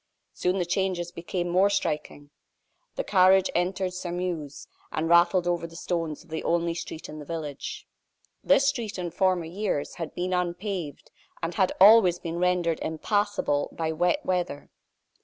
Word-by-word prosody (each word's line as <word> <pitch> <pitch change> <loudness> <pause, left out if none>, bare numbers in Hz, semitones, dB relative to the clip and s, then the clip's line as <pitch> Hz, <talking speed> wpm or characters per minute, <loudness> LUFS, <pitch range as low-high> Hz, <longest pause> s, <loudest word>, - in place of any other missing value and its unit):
Soon 180 +1 0
the 180 - 0
changes 175 -1 -1
became 175 +1 -3
more 185 +3 +3
striking. 150 -6 -3 0.6
The - - -2
carriage 190 - +4
entered 185 +1 -1
Sairmeuse, 175 -5 -4 0.3
and 160 +1 -1
rattled 170 +1 +4
over 175 -1 0
the 165 - -15
stones 165 -3 -3
of 165 - -22
the 160 - -3
only 170 0 +1
street 165 -1 -7
in 155 - -8
the - - -7
village. 150 -2 -6 0.6
This 275 - +4
street, 235 -8 -2
in 175 -2 -4
former 185 -1 +1
years, 175 -3 -2
had 165 -2 -6
been 180 +1 -2
unpaved, 180 -2 -3 0.3
and 165 +1 -2
had 190 -1 +2
always 195 -3 +7
been 170 0 -5
rendered 180 -2 +1
impassable 200 -2 0
by 160 -1 -2
wet 180 - 0
weather. 175 -6 -2
175 Hz, 155 wpm, -26 LUFS, 165-185 Hz, 0.6 s, always